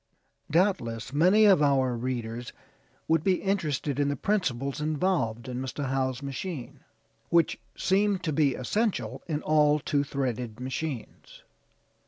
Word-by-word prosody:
Doubtless 140 Hz, -, 0 dB
many 185 Hz, +8 st, +5 dB
of 195 Hz, -7 st, +6 dB
our 135 Hz, -4 st, +3 dB
readers 120 Hz, -1 st, -4 dB, 0.5 s
would 160 Hz, -1 st, +2 dB
be 190 Hz, 0 st, +3 dB
interested 155 Hz, -8 st, -1 dB
in 145 Hz, -, +2 dB
the 145 Hz, -, 0 dB
principles 140 Hz, -, -1 dB
involved 150 Hz, -8 st, 0 dB
in 125 Hz, -1 st, -4 dB
Mr. 130 Hz, +1 st, -4 dB
Howe's 130 Hz, 0 st, -1 dB
machine; 140 Hz, +1 st, -5 dB, 0.5 s
which 170 Hz, -1 st, +3 dB, 0.2 s
seem 200 Hz, +1 st, +2 dB
to 170 Hz, -4 st, -3 dB
be 140 Hz, -3 st, +2 dB
essential 130 Hz, -, -1 dB
in 155 Hz, -3 st, -2 dB
all 150 Hz, -1 st, +4 dB
two 145 Hz, -1 st, 0 dB
threaded 125 Hz, -5 st, -3 dB
machines. 130 Hz, 0 st, -6 dB
145 Hz, 130 wpm, -28 LUFS, 125-170 Hz, 0.5 s, of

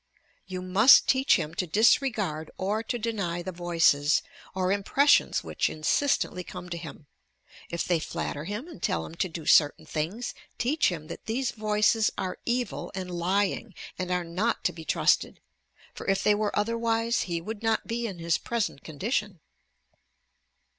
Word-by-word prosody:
You 185 Hz, -1 st, -5 dB
must 200 Hz, +8 st, +6 dB
teach 265 Hz, +1 st, +4 dB
him 160 Hz, -1 st, -2 dB
to 185 Hz, -4 st, -2 dB
disregard 205 Hz, -, +2 dB
or 205 Hz, +4 st, -1 dB
to 230 Hz, +2 st, -3 dB
deny 200 Hz, -7 st, -2 dB
the 185 Hz, -, -4 dB
voices, 165 Hz, -4 st, +2 dB, 0.3 s
or 185 Hz, 0 st, 0 dB
impressions 235 Hz, +9 st, +3 dB
which -, -, -1 dB
insistently 180 Hz, -, 0 dB
come 180 Hz, -, -9 dB
to 170 Hz, -, -4 dB
him. 160 Hz, -2 st, -9 dB, 0.6 s
If 170 Hz, -, -2 dB
they 175 Hz, -2 st, +1 dB
flatter 150 Hz, -1 st, -4 dB
him 210 Hz, -, -5 dB
and 335 Hz, -, -12 dB
tell 80 Hz, -1 st, -1 dB
him -, -, -10 dB
to 180 Hz, +2 st, -2 dB
do 160 Hz, -1 st, -7 dB
certain 145 Hz, -2 st, +4 dB
things, 170 Hz, +11 st, -3 dB, 0.2 s
teach 285 Hz, +6 st, +2 dB
him 165 Hz, -4 st, -5 dB
that -, -, -9 dB
these 240 Hz, +3 st, -1 dB
voices 215 Hz, 0 st, +2 dB
are 185 Hz, -1 st, -3 dB
evil 245 Hz, +1 st, -2 dB
and 185 Hz, -1 st, -5 dB
lying, 185 Hz, +3 st, -1 dB, 0.2 s
and 185 Hz, -1 st, -4 dB
are 180 Hz, -1 st, 0 dB
not 185 Hz, +8 st, -1 dB
to -, -, +1 dB
be 160 Hz, 0 st, -10 dB
trusted; -, -, +2 dB, 0.5 s
for -, -, -9 dB
if 195 Hz, 0 st, +1 dB
they 210 Hz, -, +5 dB
were 210 Hz, 0 st, -1 dB
otherwise 230 Hz, +2 st, +1 dB
he 170 Hz, -1 st, -1 dB
would 215 Hz, +5 st, -7 dB
not 225 Hz, -1 st, 0 dB
be 235 Hz, 0 st, -2 dB
in 195 Hz, -5 st, -7 dB
his 170 Hz, 0 st, 0 dB
present 230 Hz, -11 st, -2 dB
condition. 195 Hz, -, -3 dB
190 Hz, 165 wpm, -27 LUFS, 170-225 Hz, 0.6 s, must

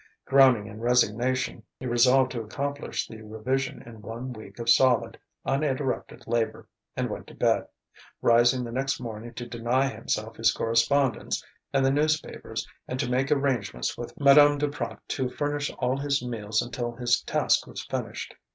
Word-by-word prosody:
Groaning 130 Hz, -6 st, +5 dB
in 110 Hz, 0 st, -9 dB
resignation, 125 Hz, +1 st, +1 dB, 0.2 s
he 130 Hz, -, -7 dB
resolved 130 Hz, +2 st, +4 dB
to 120 Hz, -, -3 dB
accomplish 140 Hz, +6 st, -3 dB
the 110 Hz, -1 st, -10 dB
revision 125 Hz, +5 st, -3 dB
in 115 Hz, -2 st, -12 dB
one 115 Hz, +4 st, -6 dB
week 110 Hz, -3 st, -12 dB
of 115 Hz, -1 st, -6 dB
solid, 125 Hz, 0 st, +4 dB, 0.3 s
uninterrupted 135 Hz, -1 st, -1 dB
labour, 115 Hz, -1 st, -1 dB, 0.3 s
and -, -, 0 dB
went -, -, -6 dB
to -, -, -13 dB
bed, -, -, +2 dB, 0.5 s
rising 120 Hz, +2 st, +4 dB
the 120 Hz, -, -6 dB
next 135 Hz, +2 st, -1 dB
morning 115 Hz, -1 st, -7 dB
to 120 Hz, -, -5 dB
deny 120 Hz, +3 st, +1 dB
himself -, -, -3 dB
his -, -, +4 dB
correspondence 115 Hz, +3 st, +1 dB, 0.3 s
and 135 Hz, -1 st, +2 dB
the 135 Hz, -, +4 dB
newspapers 155 Hz, +2 st, -1 dB, 0.2 s
and 125 Hz, -, -4 dB
to 120 Hz, -, 0 dB
make 130 Hz, +2 st, 0 dB
arrangements 135 Hz, -7 st, 0 dB
with 120 Hz, -, -8 dB
Madame 145 Hz, +1 st, +7 dB
Duprat 145 Hz, 0 st, -3 dB
to 130 Hz, -2 st, -1 dB
furnish 145 Hz, +2 st, -2 dB
all 125 Hz, +1 st, 0 dB
his 140 Hz, -2 st, 0 dB
meals 110 Hz, -3 st, -1 dB
until 120 Hz, 0 st, -4 dB
his 120 Hz, 0 st, +1 dB
task -, -, +1 dB
was -, -, -7 dB
finished. -, -, -4 dB
125 Hz, 160 wpm, -27 LUFS, 115-135 Hz, 0.5 s, Madame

